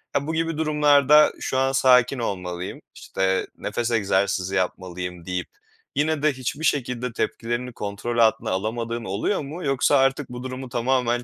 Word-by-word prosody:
Ya, 140 +1 0
bu 160 - -2
gibi 165 -1 -1
durumlarda, 150 -1 +5
"Şu 130 - -2
an 135 0 +2
sakin 130 -1 +4
olmalıyım." 90 -5 -4
işte, 95 0 -1
"Nefes 120 0 -2
egzersizi 95 -3 +1
yapmalıyım." 90 -2 -3
deyip, 90 -1 -3 0.5
yine 150 0 0
de 155 -1 +3
hiçbir 130 +4 -4
şekilde 125 -4 -1
tepkilerini 120 +2 -3
kontrol 105 +3 -4
altına 110 -3 +3
alamadığın 115 +4 -2
oluyor 100 - -1
mu? 155 +5 -7
Yoksa 135 +1 +3
artık 135 +1 +1
bu 125 0 -7
durumu 130 0 -6
tamamen 120 0 0
125 Hz, 150 wpm, -24 LUFS, 100-140 Hz, 0.5 s, durumlarda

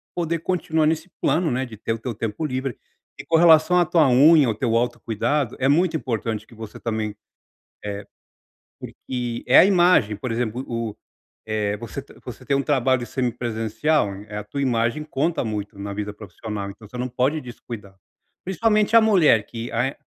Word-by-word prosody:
poder 170 -1 -1
continuar 160 -2 0
nesse 160 +3 -1
plano, 165 -2 +1
né, 130 +2 -1
de 115 -4 -11
ter 115 - -2
o 115 - -5
teu 120 +2 -4
tempo 110 +7 -3
livre 130 -2 -3 0.4
e - - -8
com 165 - +3
relação 165 +1 +6
a 175 - +4
tua 160 -4 +3
unha, 145 +3 +6
ao 110 - 0
teu 115 +2 0
autocuidado, 120 +2 -1
é 130 - +2
muito 165 +4 +3
importante 115 -6 -3
que - - -18
você, 110 -1 -9
também 110 -2 -3 0.7
eh, 100 0 -5 0.8
porque 120 -2 -5
é 125 - +7
a - - +9
imagem, 175 - +4
por 125 +4 -5
exemplo, 120 +1 -2
o 115 -3 -3 0.5
eh, 105 -1 -1
você 120 +5 -7 0.2
você 125 -4 -9
tem 140 - +1
um 140 - +1
trabalho 130 -3 +1
semipresencial, 120 0 -1
eh, 105 0 -5
a 105 - -6
tua 140 +7 -4
imagem 120 +3 0
conta 155 +2 -1
muito 105 -2 -5
na 100 0 -5
vida 105 0 -4
profissional, 105 0 -6
então 105 +2 -13
você 125 - -10
não 125 +1 -2
pode 130 +5 0
descuidar, 115 -6 -10 0.5
principalmente 210 +4 +2
a - - +9
mulher 180 - +4
que 115 +1 -6
a 125 +4 -1
125 Hz, 180 wpm, -23 LUFS, 110-155 Hz, 0.8 s, a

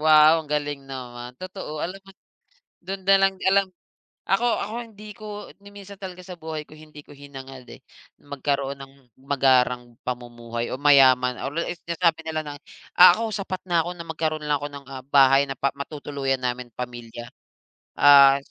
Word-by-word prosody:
Wow 155 +1 +6
ang 155 - -13
galing 145 -2 -3
naman. 125 -2 -8
Totoo, 185 -3 -7
alam 190 +3 -6
mo 195 0 -17 0.7
do'n 190 +2 -6
nalang 195 0 +4
alam 195 +1 +4 0.6
ako 195 +6 +2
ako 210 - -5
hindi 215 -1 -13
ko 215 - -11 0.4
niminsan 200 0 -12
talaga 185 -1 -8
sa 185 - -8
buhay 155 -1 -6
ko - - -16
hindi 155 -1 -13
ko - - -14
hinangad, 135 -2 -11
eh, - - -12 0.4
magkaroon 140 -1 -3
ng 135 0 -11 0.3
magarang 125 -3 +2
pamumuhay 120 -1 -5
o - - -3
mayaman 130 -3 +5
or 135 - -4 0.3
sinasabi 170 -1 +1
nila 160 -1 -2
na 145 - -6 0.4
ako 185 +5 +7
sapat 190 -2 -4
na 170 -2 +3
ako - - -3
na 170 - -8
magkaroon 155 -1 -3
lang 150 -1 +1
ako 145 - -3
ng, 140 -1 -10
ah, 130 -1 -8
bahay 135 0 +5
na 135 - -3
pa 140 - 0
matutuluyan 140 -2 -3
namin 125 0 -3
pamilya, 120 -1 -8 0.7
ah, 140 -1 +8
145 Hz, 160 wpm, -24 LUFS, 130-170 Hz, 0.7 s, ah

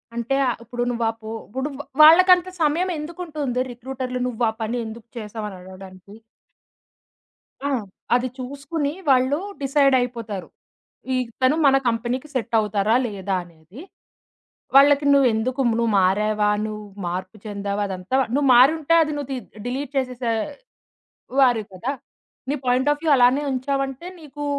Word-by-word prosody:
అంటే, 235 +3 -1
ఆ - - +2
ఇప్పుడు 240 +1 -4
నువ్వా 235 -1 -1
ఆ - - -18
పో 220 - -6 0.2
ఇప్పుడు 265 +6 -4 0.3
వాళ్ళకంత 360 +3 +7
సమయం 325 +5 +1
ఎందుకుంటుంది 300 -6 -4
రిక్రూటర్‌లు 255 +1 -5
నువ్వా 230 -2 0
పని 230 +3 -2
ఎందుకు 220 +1 -9
చేసావని 210 -2 -6
అడగడానికి. 185 +1 -13 1.5
ఆ! - - 0 0.5
అది 250 +1 +1
చూసుకొని 285 +3 -3 0.2
వాళ్ళు 260 +2 +3 0.3
డిసైడయిపోతారు. 250 -7 +1 0.7
ఇతను 255 +3 0
మన 270 - +6
కంపెనీకి 240 +5 -2
సెట్టవుతారా, 220 -3 +1
లేదా 200 -2 -3
అనేది. 170 - -15 1.0
వాళ్ళకి 285 +1 +6
నువ్వెందుకు 255 -1 +2
నువ్వు 230 0 +1
మారావా, 210 +3 +2 0.2
నువ్వు 210 -1 -7 0.2
మార్పు 185 +4 -5
చెందావా, 200 0 -3
అదంతా 185 +6 -5 0.2
నువ్వు 280 -1 +2
మారుంటే 305 +6 +5
అది 305 - -1
నువ్వు 285 -2 -5
తీ 260 - -2 0.3
డిలీట్ 265 +2 -4
చేసేసే 250 -3 -1 1.1
వారెవు 235 -5 +3
కదా! 235 +9 -3 0.6
నీ - - +1
పాయింట్ 255 +3 +2
ఆఫ్ 295 - -4
వ్యూ 320 - +1
అలానే 250 +3 +4
ఉంచావంటే, 275 +3 -2
నీకు 295 -1 -8
250 Hz, 125 wpm, -22 LUFS, 220-280 Hz, 1.5 s, వాళ్ళకంత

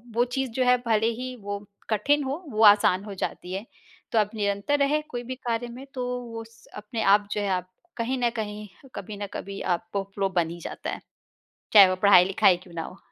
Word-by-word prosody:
वो 240 - +4
चीज़ 265 -1 -2
जो 255 +3 0
है 250 0 +5
भले 220 -1 +2
ही 255 0 -5
वो 205 0 -4 0.3
कठिन 280 +8 +2
हो, 280 +7 -4
वो 220 -2 +1
आसान 205 -2 +6
हो 205 -1 -7
जाती 185 -1 -5
है। 195 +3 -4 0.5
तो 225 - +3
आप 210 -1 +2
निरंतर 200 +6 0
रहें 285 +2 +2
कोई 245 -1 -5
भी 255 +2 -5
कार्य 240 -2 -3
में, 245 +3 -9
तो 255 - -3 0.2
वो 230 -2 -7
स 230 0 -22
अपने 210 +2 -5
आप 205 +1 +4
जो 210 - -1
है 205 - -1
आप 185 -1 -1 0.3
कहीं 245 +3 -1
न 240 -1 +2
कहीं, 210 -1 -5 0.3
कभी 205 +2 -7
न - - -4
कभी 195 0 -6 0.2
आपको 200 +1 -4
फ़्लो 195 -1 0
बन 175 -3 0
ही 170 +1 -8
जाता - - -6
है, - - -5 0.7
चाहे 200 -4 +9
वो 185 - 0
पढ़ाई-लिखाई 190 -1 +6
क्यों 180 -1 -16
ना 165 - -3
हो। 185 - -9
210 Hz, 220 wpm, -26 LUFS, 195-245 Hz, 0.7 s, चाहे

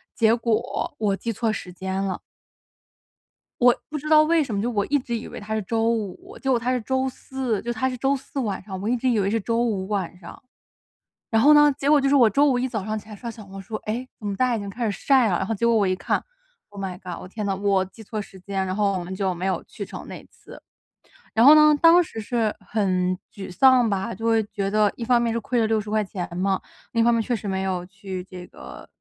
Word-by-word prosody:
结 225 0 +4
果 230 +3 -1
我 205 -3 +1
记 230 +3 -4
错 225 +1 -1
时 180 -4 -6
间 190 +1 -3
了。 190 -2 -2 1.4
我 245 0 +6 0.2
不 305 - -4
知 305 +2 -6
道 310 0 +7
为 325 0 +3
什 240 -6 -5
么， 200 - 0
就 240 - -1
我 205 -4 0
一 290 0 +2
直 240 -2 -3
以 225 - -7
为 - - -8
它 215 +1 -4
是 220 - -1
周 225 +3 0
五， 230 - -4
结 270 - -3
果 245 -2 +3
它 250 +2 -1
是 250 - -1
周 260 +3 0
四， 255 -5 -3
就 240 - -3
它 260 +3 0
是 250 - -5
周 270 +3 +1
四 270 +1 -6
晚 210 -7 -2
上， 190 -1 -7
我 210 - -2
一 245 - +2
直 255 +2 0
以 225 -3 +2
为 195 0 +1
是 225 - +1
周 230 +3 0
五 195 -5 -1
晚 190 -4 -3
上。 170 - -12 0.9
然 225 -1 +3
后 300 +3 +7
呢， 295 -1 +6
结 280 0 0
果 300 -1 +6
就 275 - +1
是 285 - +4
我 240 -5 +6
周 280 +8 +3
五 250 -2 +1
一 260 - 0
早 215 -5 -4
上 215 0 -2
起 210 - -18
来 210 - -8
刷 235 +3 -6
小 215 -2 -12
红 195 0 -9
书， 215 +3 -7
诶， 240 +4 -3
怎 210 - -6
么 200 - -2
大 255 - +2
家 240 - +1
已 - - -4
经 200 -1 -6
开 235 +3 -3
始 - - 0
晒 260 -6 +5
了。 175 - +1
然 - - -2
后 225 - -1
结 235 - -1
果 235 - +4
我 205 -3 +3
一 185 - +1
看， 175 - -1 0.5
oh 205 -1 -11
my 180 -1 -5
god， 180 -2 -6
我 - - -9
天 210 +2 -5
哪， 195 -1 0
我 195 -1 +2
记 220 +4 -14
错 215 0 -4
时 190 -1 -13
间， 190 0 -3
然 185 - -3
后 200 -2 +1
我 - - -5
们 185 +2 -6
就 190 -1 0
没 180 +2 -5
有 190 - -1
去 - - -8
成 - - -9
那 - - -9
次。 - - -15 0.7
然 230 +3 +4
后 300 +2 +10
呢， 305 0 +7
当 335 +2 +7
时 225 -8 -8
是 220 0 -1
很 185 -3 0 0.2
沮 195 -3 -8
丧 255 +2 +5
吧。 200 +3 -2
就 225 - -6
会 225 -1 +3
觉 200 -1 -3
得 210 -1 +3
一 235 - -4
方 245 0 +4
面 235 -1 0
是 230 - 0
亏 240 +2 -1
了 220 - +3
60 215 -1 -1
块 215 0 +1
钱 190 -3 -5
嘛， 190 0 0 0.3
另 230 - +1
一 - - +4
方 235 - +4
面 230 -1 +1
确 245 - -2
实 210 -1 -6
没 190 0 -1
有 185 -2 -2
去 190 -2 -7
这 180 -1 -9
个 65 - -12
220 Hz, 300 characters per minute, -24 LUFS, 195-245 Hz, 1.4 s, 后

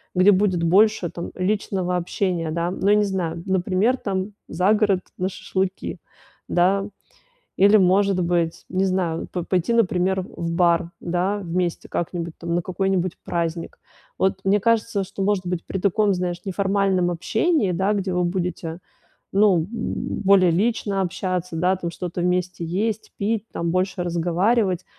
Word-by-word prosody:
где 185 +3 +6
будет 185 -3 +1
больше 195 +1 +3
там 170 - -6
личного 185 -1 -1
общения, 175 -2 -1
да, 170 +2 -1
ну, 195 +1 0
я 210 - +6
не 210 - +3
знаю, 170 -4 -2
например, 190 +5 +1
там, 195 -1 -3 0.2
за 185 +6 +2
город 205 -3 +2 0.2
на 185 +1 -1
шашлыки, 190 0 -3 0.5
да, 195 +3 +2 0.7
или, 200 +2 +6
может 190 0 +3
быть, 170 -1 0
не 190 +2 +1
знаю, 180 -3 -1
п 180 - -4
пойти, 185 +6 0
например, 190 -4 +2
в 170 -2 -5
бар, 170 0 +2
да, 180 +4 -1
вместе 175 -1 -2
как-нибудь, 170 -1 -3
там, 170 0 -3
на 175 - +1
какой-нибудь 185 0 -1
праздник. 170 -1 -3 0.4
Вот, 190 0 +1
мне 205 +2 +4
кажется, 225 -2 +1
что, 195 +1 -5
может 195 -3 0
быть, 175 -1 -3
при 190 - -4
таком, 200 +1 +2
знаешь, 180 -1 -3
неформальном 195 -1 +1
общении, 210 - +1
да, 190 +4 +1
где 195 -2 -2
вы 180 0 +1
будете, 175 -2 -3 0.6
ну, 200 -3 +4
м, 160 - -1 0.6
более 190 -2 +6
лично 200 +1 0
общаться, 180 -1 -3
да, 180 +3 +2
там 170 -2 -4
что-то 175 0 -4
вместе 180 -1 -1
есть, 205 +6 -2
пить, 215 +1 -1
там, 170 0 -2
больше 185 0 0
разговаривать. 180 +3 +1
185 Hz, 155 wpm, -23 LUFS, 175-200 Hz, 0.7 s, где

